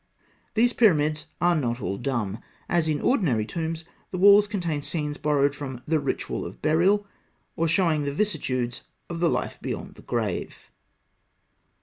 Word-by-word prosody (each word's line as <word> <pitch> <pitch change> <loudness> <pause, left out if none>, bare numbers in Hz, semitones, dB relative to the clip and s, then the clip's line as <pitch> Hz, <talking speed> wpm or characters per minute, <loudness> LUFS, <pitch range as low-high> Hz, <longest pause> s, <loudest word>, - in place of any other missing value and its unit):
These 240 +2 +4
pyramids 155 -8 +3
are 175 0 +3
not 120 -5 -1
all 100 -3 -3
dumb. 120 -5 -2 0.3
As 170 -2 +1
in 150 -2 0
ordinary 145 - +2
tombs, 165 +4 -3 0.3
the 185 - -4
walls 200 +2 +7
contain 175 -8 -2
scenes 150 -1 -3
borrowed 145 -1 +2
from 130 -4 -7
the 160 0 +2
"Ritual 140 - -2
of - - -8
Burial," 185 +7 +3 0.5
or 165 - +1
showing 165 -3 +2
the 145 -1 -1
vicissitudes 135 - -1 0.3
of 170 - -4
the 170 -1 +3
life - - -2
beyond - - -5
the - - -15
grave. - - -3
155 Hz, 150 wpm, -26 LUFS, 140-175 Hz, 0.5 s, walls